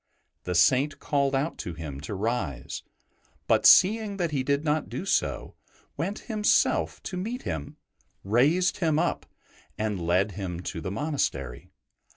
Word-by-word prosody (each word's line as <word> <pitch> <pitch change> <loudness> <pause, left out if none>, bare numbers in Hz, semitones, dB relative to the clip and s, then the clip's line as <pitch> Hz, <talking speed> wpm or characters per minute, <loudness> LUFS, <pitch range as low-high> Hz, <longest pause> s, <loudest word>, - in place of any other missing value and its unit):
The 90 - -2
Saint 130 - +3
called 140 -2 0
out 145 +5 -1
to 85 - -5
him 75 -4 -7
to 85 +7 -5
rise; 100 - -3 0.6
but, - - +4
seeing 210 +1 +5
he 145 -3 -1
did 140 +2 0
not 155 +1 0
do - - -5
so, 70 - -1 0.4
went 185 +8 -3
himself 215 -3 +1
to 185 - -5
meet 225 +7 -4
him, 80 -5 -5 0.5
raised 145 - +2
him 160 -4 +1
up, 170 +2 -1 0.5
and 105 -4 -2
led 90 +4 +1
him 90 -3 -5
to 80 -1 -5
the 95 - -4
monastery. 100 - -3
130 Hz, 145 wpm, -27 LUFS, -, 0.6 s, seeing